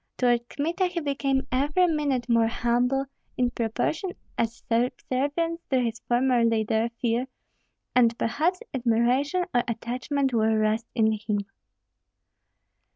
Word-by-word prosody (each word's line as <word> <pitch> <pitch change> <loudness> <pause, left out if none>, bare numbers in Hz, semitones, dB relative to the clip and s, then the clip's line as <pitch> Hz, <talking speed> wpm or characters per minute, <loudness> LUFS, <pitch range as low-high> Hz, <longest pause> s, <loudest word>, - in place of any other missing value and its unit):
Toward 240 -1 +2
Kmita 340 +6 0
he 360 -1 -3
became 275 -3 0
every 290 +8 +2
minute 290 -7 0
more 230 -2 +4
humble, 245 +3 +1 0.3
in 245 -1 +1
proportion 245 - -2 0.2
as 230 +1 -2
subservience 280 +7 -1
to 265 - +3
his 230 -2 -1
former 245 0 +3
leader, 225 0 +1
fear, 240 +1 0 0.7
and 235 -2 +4
perhaps 320 - 0
admiration 255 +7 +1
or 245 - +4
attachment 250 +4 -2
were 220 -1 +2
roused 215 +1 +1
in 220 -2 +3
him. 210 -1 -2
245 Hz, 120 wpm, -26 LUFS, 230-280 Hz, 0.7 s, more